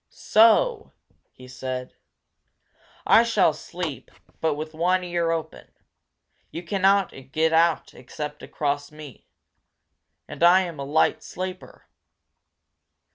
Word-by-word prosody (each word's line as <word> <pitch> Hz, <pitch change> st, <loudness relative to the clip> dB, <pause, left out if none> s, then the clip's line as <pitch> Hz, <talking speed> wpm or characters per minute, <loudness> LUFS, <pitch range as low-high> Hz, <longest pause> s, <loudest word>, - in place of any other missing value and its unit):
"So!" 430 Hz, -, +3 dB, 0.4 s
he 130 Hz, -, -15 dB
said. 130 Hz, 0 st, -6 dB, 1.1 s
"I 225 Hz, -, +6 dB
shall 220 Hz, -8 st, +2 dB
sleep 155 Hz, -4 st, -7 dB, 0.3 s
but 160 Hz, -2 st, 0 dB
with 155 Hz, +1 st, -7 dB
one 180 Hz, +3 st, +1 dB
ear 170 Hz, -1 st, -1 dB
open! 165 Hz, -1 st, -5 dB, 0.8 s
You 170 Hz, -, -7 dB
cannot 195 Hz, +2 st, +2 dB, 0.2 s
get 160 Hz, +1 st, +1 dB
out 165 Hz, 0 st, +2 dB
except 150 Hz, +4 st, -8 dB
across 145 Hz, -1 st, -3 dB
me. 150 Hz, -5 st, -13 dB, 1.0 s
And -, -, -10 dB
I 175 Hz, +2 st, +6 dB
am 170 Hz, -5 st, -6 dB
a 140 Hz, -, -4 dB
light 150 Hz, +3 st, +1 dB
sleeper!" 185 Hz, 0 st, -8 dB
165 Hz, 110 wpm, -24 LUFS, 150-185 Hz, 1.1 s, I